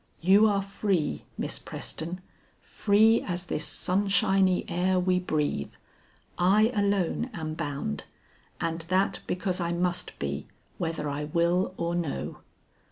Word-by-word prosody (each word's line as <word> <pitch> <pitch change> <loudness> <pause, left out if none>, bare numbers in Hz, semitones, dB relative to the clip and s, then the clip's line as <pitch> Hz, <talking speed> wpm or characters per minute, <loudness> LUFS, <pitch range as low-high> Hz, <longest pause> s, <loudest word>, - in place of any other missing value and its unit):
You 195 +5 +6
are 200 -2 +1
free, 195 -4 -1
Miss - - -2
Preston, 170 +3 -5 0.4
free 220 +2 +4
as 180 -1 -3
this 150 -3 -2
sunshiny 190 -1 +2
air 180 +2 +1
we 180 0 +2
breathe; 150 - -1 0.7
I 210 +6 +4
alone 200 +2 +1
am 155 -3 -4
bound, 145 - -3 0.5
and 165 0 -2
that 195 +2 +2
because 185 0 -1
I 170 -1 -1
must 175 +1 -1
be 70 0 -3 0.3
whether 165 -3 -2
I 145 +1 -2
will 170 +4 +1
or 170 0 -1
no." 165 - -3
180 Hz, 125 wpm, -28 LUFS, 165-195 Hz, 0.7 s, You